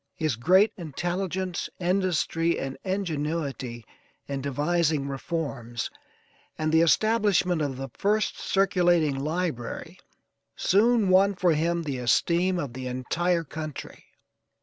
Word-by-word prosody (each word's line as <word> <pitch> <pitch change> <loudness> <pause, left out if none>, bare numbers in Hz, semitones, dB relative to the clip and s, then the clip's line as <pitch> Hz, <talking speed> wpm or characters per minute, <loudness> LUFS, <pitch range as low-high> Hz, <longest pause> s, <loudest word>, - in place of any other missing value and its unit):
His 155 -6 -1
great 190 - +4
intelligence, 180 +3 -3
industry 175 -2 +1
and 135 0 -4
ingenuity 150 - -3 0.4
in 140 -1 -4
devising 150 +1 0
reforms, 135 -5 -4 0.7
and 155 0 0
the 160 0 +5
establishment 195 -2 +3
of 140 -3 -2
the 135 0 -5
first 210 +2 +1
circulating 175 -6 +2
library, 155 -4 -3 0.6
soon 215 +1 +3
won 195 +2 +5
for 180 -2 +3
him 170 +2 0
the 140 -5 -3
esteem 170 +9 +2
of 145 -8 -4
the 130 0 -5
entire 165 +8 0
country. 155 0 -7
165 Hz, 110 wpm, -26 LUFS, 140-185 Hz, 0.7 s, the